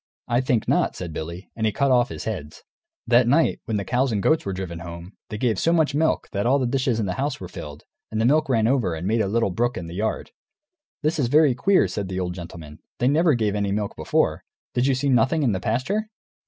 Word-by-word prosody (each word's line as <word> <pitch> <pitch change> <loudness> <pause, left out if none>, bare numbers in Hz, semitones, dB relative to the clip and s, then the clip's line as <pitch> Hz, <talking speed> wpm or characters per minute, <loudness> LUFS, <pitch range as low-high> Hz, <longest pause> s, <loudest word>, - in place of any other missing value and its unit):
"I 120 +1 +2
think 125 -4 0
not," - - +1
said 85 -3 -6
Billy; 85 +5 -7
and 110 -1 0
he - - +1
cut 140 +5 +1
off 125 0 +3
his - - -6
heads. 85 -9 -6 0.4
That 120 0 +4
night, 150 +6 +3
when 110 - -1
the 100 - -3
cows 130 +1 +1
and 110 - 0
the - - +2
goats 155 -8 +2
were - - -1
driven 90 -3 -5
home, 85 +2 -9 0.2
they 105 - -4
gave 110 -3 0
so 165 - +2
much 160 -4 +2
milk 155 +2 +1
that 100 +2 -1
all 135 +3 +4
the 130 - 0
dishes 125 -2 0
in 110 - 0
the 90 - -2
house 140 -1 -2
were 90 - -7
filled, 75 -4 -9 0.3
and 110 - -2
the 110 - +2
milk 150 +3 +3
ran 115 -4 +2
over 115 -9 +1
and 80 +2 -5
made 110 +3 +2
a 100 - 0
little 110 0 +1
brook 120 +6 0
in 85 - -5
the 85 - -8
yard. 105 +4 -2 0.7
"This 155 +1 0
is 130 - +2
very 145 +1 +5
queer," 195 +10 +3
said 100 -2 -4
the 95 0 -3
old 90 -1 -2
gentleman; 85 -3 -9 0.2
"they 125 - +1
never 155 +1 +4
gave 110 -4 0
any 100 -1 -1
milk 105 0 -2
before. - - 0 0.3
Did 125 +2 +1
you 135 - +3
see 135 +3 -1
nothing 135 +5 +3
in 125 - +3
the 95 - -1
pasture?" 130 - -1
115 Hz, 255 wpm, -23 LUFS, 95-135 Hz, 0.7 s, very